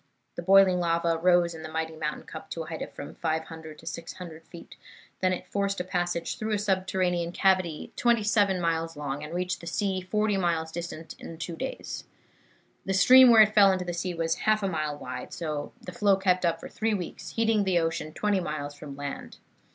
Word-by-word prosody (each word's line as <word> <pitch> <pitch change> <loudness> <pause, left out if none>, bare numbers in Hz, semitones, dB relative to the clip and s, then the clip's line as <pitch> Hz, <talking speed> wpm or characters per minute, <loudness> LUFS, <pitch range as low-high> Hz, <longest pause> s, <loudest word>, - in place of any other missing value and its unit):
The - - -4
boiling 190 0 +6
lava 170 -1 +1
rose 175 0 +4
in 160 - -9
the 155 - -7
mighty 160 0 -3
mountain 150 -1 -3
cup 200 - -10
to 165 - -4
a - - -10
height 160 0 -6
of - - -5
from 145 - -8
500 160 -1 -4
to 165 - -15
600 165 0 -7
feet. 170 - -12 0.4
Then 185 0 +2
it 185 - -3
forced 200 0 -1
a - - -1
passage 175 -2 -2
through 215 0 -1
a - - +2
subterranean 185 -3 0
cavity 185 -4 +1
twenty 235 -2 +2
seven 205 -3 +2
miles 165 -1 -1
long, 145 0 -4
and 150 - -7
reached 180 +1 -2
the 170 - -9
sea 190 +1 -1
forty 210 +2 0
miles 165 -3 0
distant, 165 -1 -6
in 165 - -9
two 170 +1 -5
days. 265 - -5 0.8
The 195 - -1
stream 255 +7 +8
where 225 -2 +9
it 215 0 0
fell 200 -2 +7
into 185 -1 -1
the 175 - -3
sea 175 +1 -3
was 165 0 0
half 215 -1 +3
a - - +2
mile 155 -4 -2
wide, - - -7
and 150 -3 -3
the - - -7
flow 205 -4 +3
kept 185 -2 +2
up 165 0 0
for - - -8
three 220 -1 -1
weeks, 180 -4 -6
heating 225 -2 +2
the 190 -2 +2
ocean 165 -2 -1
twenty 205 +3 0
miles 150 -4 -4
from 145 -1 -9
land. 145 -1 -6
175 Hz, 210 wpm, -27 LUFS, 160-195 Hz, 0.8 s, where